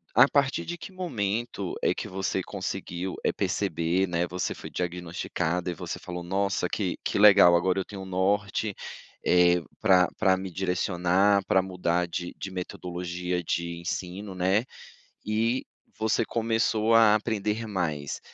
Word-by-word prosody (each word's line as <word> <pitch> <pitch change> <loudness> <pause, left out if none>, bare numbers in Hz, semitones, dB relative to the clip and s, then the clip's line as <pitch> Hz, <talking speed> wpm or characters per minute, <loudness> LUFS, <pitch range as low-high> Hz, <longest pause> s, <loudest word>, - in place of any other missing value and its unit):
a 125 +4 +8
partir 140 -1 +1
de 175 0 -5
que 190 - -9
momento 115 - -3
é - - +3
que - - -5
você 95 0 -2
conseguiu, 95 -2 -4
eh, - - +2
perceber, 85 +3 0
né, 85 0 0
você 90 +1 -2
foi - - -9
diagnosticada 90 0 -2
e - - -4
você 90 +1 -5
falou: 90 -1 -6
"Nossa, 95 0 0
que 95 -4 -2
que - - 0
legal 100 -4 +8
agora 90 +2 +2
eu - - -2
tenho 100 -2 -8
um - - -8
norte, 100 +2 0 0.5
eh, 90 0 +5 0.2
pra 95 -4 +5
pra 95 -1 +4
me 95 -1 -6
direcionar, 95 +2 +2
pra 95 - +4
mudar 90 -2 0
de 90 +1 -4
de 95 - -6
metodologia 90 -1 -4
de 85 +1 -2
ensino, 95 +3 -5
né, 95 +6 +2 0.6
e 115 +4 0 0.3
você 110 +1 +1
começou 115 -1 +1
a 110 -2 +7
aprender 110 0 -1
mais? 80 -8 -2
95 Hz, 150 wpm, -27 LUFS, 90-105 Hz, 0.6 s, a